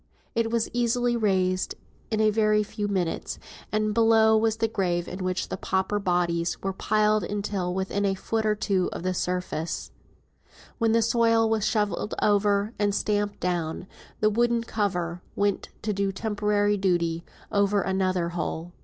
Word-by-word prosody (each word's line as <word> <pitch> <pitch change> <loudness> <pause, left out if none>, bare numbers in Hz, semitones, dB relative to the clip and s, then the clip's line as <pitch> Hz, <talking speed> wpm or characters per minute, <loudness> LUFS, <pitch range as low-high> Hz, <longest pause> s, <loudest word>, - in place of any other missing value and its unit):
It 230 -1 +1
was 230 -1 0
easily 240 0 +1
raised 185 -4 +1 0.3
in 220 -2 -1
a 215 0 +4
very 215 0 +3
few 210 0 -4
minutes, 185 -4 -2 0.3
and 215 0 +1
below 225 -1 +5
was 220 0 +2
the 225 - +1
grave 175 -5 -1
in 185 +1 -5
which 185 0 -1
pauper 190 +2 0
bodies 175 -3 0
were 195 0 -1
piled 215 +1 +2
until 200 -3 -2
within 190 +2 -1
a 195 -1 +1
foot 220 +3 -2
or 215 -1 +2
two 195 -3 0
of - - -6
the 185 0 0
surface; 180 -3 -3 0.9
when 225 -1 +3
the 230 0 +4
soil 230 0 +3
was 220 -2 +1
shovelled 210 -1 -1
over, 205 +1 +2
and 205 -1 +1
stamped 205 -1 -1
down, 170 -3 -1
and 185 - -14 0.3
the 215 - +5
wooden 235 +1 +2
cover 180 -6 -2
went 200 -1 0
to 210 0 0
do 200 0 0
temporary 205 0 0
duty 170 -3 0 0.3
over 200 0 +2
another 185 -2 0
hole. 170 0 -4
205 Hz, 160 wpm, -26 LUFS, 185-220 Hz, 0.9 s, below